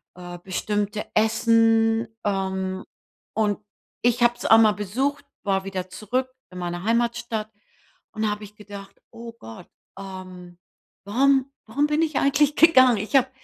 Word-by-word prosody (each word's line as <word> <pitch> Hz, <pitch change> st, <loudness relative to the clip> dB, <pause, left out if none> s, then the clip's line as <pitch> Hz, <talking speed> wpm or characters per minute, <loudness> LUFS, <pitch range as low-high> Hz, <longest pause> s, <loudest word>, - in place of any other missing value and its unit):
äh, 175 Hz, -1 st, -9 dB
bestimmte 205 Hz, +3 st, -2 dB
Essen, 225 Hz, +1 st, +3 dB, 0.2 s
ähm, 190 Hz, -1 st, -2 dB, 0.5 s
und 210 Hz, -1 st, 0 dB, 0.4 s
ich 245 Hz, 0 st, +2 dB
habe 240 Hz, 0 st, +4 dB
es -, -, -8 dB
auch 225 Hz, -, +7 dB
mal 215 Hz, -2 st, +5 dB
besucht, 260 Hz, +8 st, -2 dB, 0.2 s
war 195 Hz, -1 st, 0 dB
wieder 185 Hz, -1 st, -5 dB
zurück 250 Hz, +7 st, -2 dB, 0.2 s
in 180 Hz, -, -10 dB
meiner 175 Hz, 0 st, -4 dB
Heimatstadt 235 Hz, -1 st, -1 dB, 0.6 s
und 220 Hz, 0 st, -3 dB
da -, -, +2 dB
habe 210 Hz, 0 st, -5 dB
ich 210 Hz, +1 st, -16 dB
gedacht: 200 Hz, -1 st, -11 dB
„Oh 230 Hz, 0 st, -9 dB
Gott, 110 Hz, 0 st, -11 dB, 0.3 s
ähm, 185 Hz, -2 st, -10 dB, 0.5 s
warum 270 Hz, +5 st, +2 dB
warum 285 Hz, +7 st, 0 dB
bin 300 Hz, +1 st, +1 dB
ich 310 Hz, -3 st, -1 dB
eigentlich 280 Hz, +1 st, +2 dB
gegangen? 260 Hz, -8 st, +6 dB
Ich 215 Hz, +7 st, -4 dB
habe 260 Hz, -1 st, +4 dB
215 Hz, 145 wpm, -24 LUFS, 195-240 Hz, 0.6 s, auch